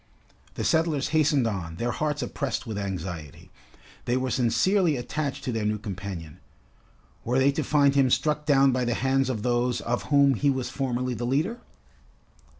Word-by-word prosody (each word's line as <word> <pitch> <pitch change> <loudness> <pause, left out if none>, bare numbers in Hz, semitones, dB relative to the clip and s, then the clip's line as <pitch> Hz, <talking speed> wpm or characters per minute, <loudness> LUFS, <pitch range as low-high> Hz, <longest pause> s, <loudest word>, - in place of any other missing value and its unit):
The - - -3
settlers 160 -4 +1
hastened 150 -4 +2
on, 95 -7 -3
their 120 +7 -2
hearts 150 +1 -2
oppressed 140 -2 -3
with 110 -3 -5
anxiety. 90 -4 -6 0.5
They 120 +1 +1
were 130 0 -2
sincerely 160 - +2
attached 140 +3 -3
to 125 - -2
their 115 -2 -2
new 105 0 0
companion. 95 -6 -7 0.8
Were 125 +2 0
they 135 +1 +4
to 150 +2 -2
find 140 0 +3
him 135 -2 +3
struck 150 +3 0
down 135 -2 +5
by 130 0 0
the 120 -1 0
hands 135 +1 +1
of 110 -5 -3
those 120 0 +1
of 120 +1 -2
whom 140 -1 +4
he 140 +4 +1
was 130 -2 -1
formerly 125 -1 -2
the 120 +1 -3
leader? 160 - -1
130 Hz, 170 wpm, -26 LUFS, 110-140 Hz, 0.8 s, down